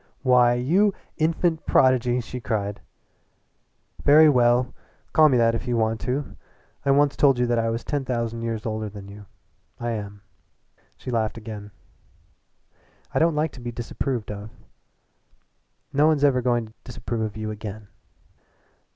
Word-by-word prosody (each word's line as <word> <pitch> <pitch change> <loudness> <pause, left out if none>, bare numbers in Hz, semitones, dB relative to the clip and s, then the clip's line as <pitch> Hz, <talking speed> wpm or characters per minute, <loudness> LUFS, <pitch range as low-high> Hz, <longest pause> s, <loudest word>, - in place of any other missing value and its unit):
"Why, 125 -2 +5
you 185 +12 +2 0.2
infant 165 +1 0
prodigy!" 125 -1 +3
she 125 +2 -7
cried. 105 -4 -3 1.2
"Very 155 +2 +7
well, 125 -1 +3 0.4
call 155 -1 +6
me 130 - +3
that 115 -1 +3
if 115 +2 -4
you 120 -1 0
want 110 0 0
to. 135 +3 -3 0.5
I - - -1
once 140 +1 +3
told 135 -3 +4
you 125 - +2
that 120 -1 +1
I 115 0 0
was 115 +1 -3
ten 145 -2 -2
thousand 115 -2 -3
years 115 -2 -3
older 110 -1 -3
than 100 -1 -10
you 100 0 -12 0.5
I 120 0 -2
am." 100 -2 -6 0.7
She 125 - -7
laughed 110 -1 -1
again. 105 -2 -8 1.4
"I - - +2
don't 165 -1 +3
like 150 0 0
to 125 - -12
be 120 0 -5
disapproved 120 0 -4
of." 105 +1 -7 1.4
"No 145 +2 +4
one's 155 -3 +2
ever 135 -3 +4
going 120 -2 +1
to 110 - -16
disapprove 115 -2 -5
of 110 -1 -3
you 110 0 -4
again." 105 0 -8
120 Hz, 155 wpm, -24 LUFS, 110-135 Hz, 1.4 s, Very